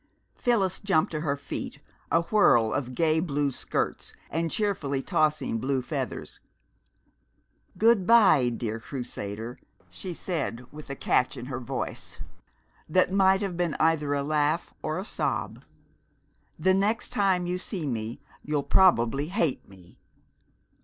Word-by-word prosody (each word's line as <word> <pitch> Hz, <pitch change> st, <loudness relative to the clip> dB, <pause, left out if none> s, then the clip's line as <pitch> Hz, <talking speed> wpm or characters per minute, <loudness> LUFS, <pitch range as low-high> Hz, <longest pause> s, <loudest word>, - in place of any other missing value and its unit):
Phyllis 200 Hz, -7 st, +1 dB
jumped 190 Hz, -6 st, +1 dB
to 155 Hz, -, -2 dB
her 145 Hz, -2 st, -1 dB
feet, 140 Hz, -, -6 dB, 0.3 s
a 165 Hz, +2 st, +3 dB
whirl 130 Hz, -, +4 dB
of 130 Hz, -2 st, -3 dB
gay 160 Hz, +1 st, +3 dB
blue 145 Hz, -4 st, 0 dB
skirts -, -, -3 dB, 0.2 s
and 165 Hz, +2 st, 0 dB
cheerfully 160 Hz, -10 st, -1 dB
tossing 150 Hz, -7 st, +1 dB
blue 130 Hz, +1 st, -1 dB
feathers. 130 Hz, -, -4 dB, 1.4 s
"Good 220 Hz, -4 st, +4 dB
by, 195 Hz, -, +6 dB
dear 115 Hz, -2 st, -3 dB
Crusader!" 115 Hz, -2 st, -6 dB, 0.3 s
she 180 Hz, -3 st, -6 dB
said 135 Hz, -10 st, -3 dB
with 150 Hz, -1 st, -11 dB
a 140 Hz, -, -4 dB
catch 130 Hz, +1 st, +1 dB
in 125 Hz, -, -6 dB
her 125 Hz, -1 st, -4 dB
voice 120 Hz, -, -5 dB, 0.7 s
that 185 Hz, +3 st, +3 dB
might 190 Hz, 0 st, +4 dB
have 190 Hz, -3 st, -3 dB
been 175 Hz, -2 st, -1 dB
either 150 Hz, -3 st, +2 dB
a 140 Hz, -, -1 dB
laugh 150 Hz, +2 st, 0 dB
or 155 Hz, +2 st, -2 dB
a 190 Hz, -, -4 dB
sob. -, -, -2 dB, 0.9 s
"The 185 Hz, +4 st, +3 dB
next 205 Hz, +5 st, +1 dB
time 190 Hz, -3 st, +1 dB
you 180 Hz, +1 st, -2 dB
see 180 Hz, -3 st, -4 dB
me 115 Hz, -3 st, -3 dB, 0.2 s
you'll 150 Hz, -1 st, -1 dB
probably 140 Hz, -7 st, +4 dB
hate 170 Hz, -, -1 dB
me! 90 Hz, -3 st, -17 dB
155 Hz, 140 wpm, -27 LUFS, 130-185 Hz, 1.4 s, by